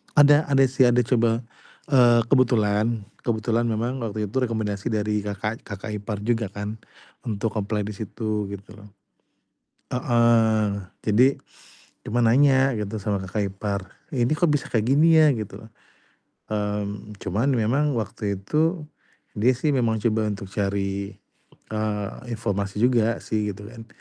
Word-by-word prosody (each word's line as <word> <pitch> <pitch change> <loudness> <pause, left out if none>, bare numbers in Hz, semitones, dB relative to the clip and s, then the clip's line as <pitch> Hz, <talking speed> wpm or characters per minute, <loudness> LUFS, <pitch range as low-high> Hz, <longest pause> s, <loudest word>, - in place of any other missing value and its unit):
Ada 145 +1 +6
ada 135 -1 +4
sih, 130 -1 +4
ada 120 0 +3
coba, 115 -1 +1 0.5
eee, 120 -3 +6
kebetulan 115 -4 +2 0.2
kebetulan 115 0 0
memang 115 +4 -2
waktu 105 -3 -3
itu - - -3
rekomendasi 110 -4 -2
dari 105 -2 0
kakak 105 +2 -4
kakak 105 +1 -6
ipar 105 0 -5
juga 115 -1 0
kan 105 +3 -6 0.5
untuk 110 0 -2
apply 105 +1 -2
di 105 - -5
situ 105 0 -3
gitu 100 +2 -10
loh. 105 - -14 1.0
Heeh, 110 -5 +2 0.2
jadi, 115 +4 +4 0.8
cuma 120 - -2
nanya 135 +2 +4
gitu 105 0 -3
sama 100 -1 -2
kakak 100 +2 -2
ipar, 100 +1 -3 0.3
"Ini 125 -2 +1
kok 165 +1 +2
bisa 145 -2 0
kayak 115 +1 +1
gini 155 +4 +5
ya?" 155 -1 +6
Gitu. 110 -5 -4 0.9
Mmm, 105 0 -3
cuman 105 +8 0
memang 135 +6 +1
waktu 105 -2 -3
itu 155 - 0 0.5
dia 125 +4 +4
sih 150 +4 0
memang 115 -4 +1
coba 110 -1 +1
untuk 100 -2 -5
cari, 100 -1 -2 0.6
eee, 105 -2 -2 0.3
informasi 100 -3 -2
juga 115 -2 +3
sih 105 -1 -1
gitu 105 +2 -11
kan, 115 -1 -11
110 Hz, 140 wpm, -24 LUFS, 105-120 Hz, 1.0 s, Ada